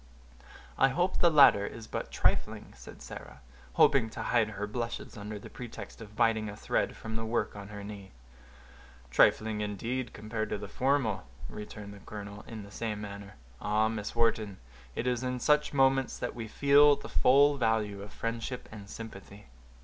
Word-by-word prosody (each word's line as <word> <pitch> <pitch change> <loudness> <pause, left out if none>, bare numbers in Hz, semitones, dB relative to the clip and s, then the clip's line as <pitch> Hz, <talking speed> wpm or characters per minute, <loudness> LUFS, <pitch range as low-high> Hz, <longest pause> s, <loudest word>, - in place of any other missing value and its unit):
"I 135 - +7
hope 175 +7 0
the 175 - +6
latter 140 -10 +7
is 115 -1 -8
but - - -4
trifling," - - 0
said - - -12
Sarah, 65 +2 -10 0.3
stooping 120 -5 +5
to - - -6
hide 115 -3 +2
her 105 -1 -4
blushes 115 +2 -4
under 105 0 -6
the 105 - -10
pretext 120 -1 -9
of 105 -1 -11
biting 110 -2 +2
a 105 - -8
thread - - 0
from 110 0 -6
the 110 - -3
work 110 -2 -1
on 100 -1 -8
her 105 -1 -8
knee. 100 -2 -8 1.0
"Trifling, 110 - +4
indeed, 115 +4 -3
compared 110 0 -4
to - - -1
the 100 - -7
former," 125 -3 +1 0.3
returned 105 -1 -8
the 100 - -12
colonel, 105 0 -8
in 110 -2 -7
the 100 - -12
same 110 -1 -3
manner. 100 -1 -8 0.3
"Ah! 110 +1 +2
Miss 105 -1 -4
Wharton, 110 -4 +1 0.4
it 115 - -2
is 125 -1 +1
in 125 -1 -2
such 150 +3 +3
moments 135 -1 +3
that - - -3
we 115 -2 -6
feel 145 +4 +6
the - - -9
full 140 +2 +5
value 110 -4 0
of 100 0 -9
friendship 115 +2 -4
and 105 -2 -10
sympathy." 105 -2 -10
110 Hz, 175 wpm, -30 LUFS, 105-125 Hz, 1.0 s, I